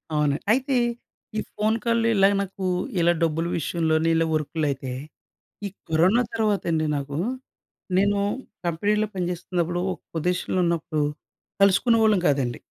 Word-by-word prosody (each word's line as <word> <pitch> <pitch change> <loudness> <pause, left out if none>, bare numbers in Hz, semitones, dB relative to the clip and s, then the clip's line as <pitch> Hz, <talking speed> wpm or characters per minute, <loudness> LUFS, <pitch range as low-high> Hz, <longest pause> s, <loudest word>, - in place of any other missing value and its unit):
అవును. 150 -2 +2 0.2
అయితే, 265 +3 +2 0.6
ఈ - - +2 0.2
ఫోన్ 215 +1 +1
కాల్‌లు 230 -1 +2
ఇలాగా 195 +1 +5
నాకూ, 195 -1 -4 0.3
ఇలా 170 0 +4
డబ్బులు 165 +1 0
విషయంలోని 160 0 +1
ఇలా 165 0 +3
వర్కులయితే, 145 -4 -1 0.7
ఈ - - -2 0.2
కరోనా 180 +10 +4
తర్వాతండి 195 -8 +1
నాకూ, 140 +1 -4 0.8
నేనూ 200 +1 +2 0.4
కంపెనీలో 210 +6 +1
పనిచేస్తున్నప్పుడు 175 -1 -2
ఒక - - -9 0.2
పొదీషన్‌లో 180 +3 0
ఉన్నప్పుడు, 160 -2 -1 0.6
కలుసుకునేవాళ్ళం 215 +1 +4
కాదండి! 135 -4 0
175 Hz, 115 wpm, -24 LUFS, 160-205 Hz, 0.8 s, ఇలాగా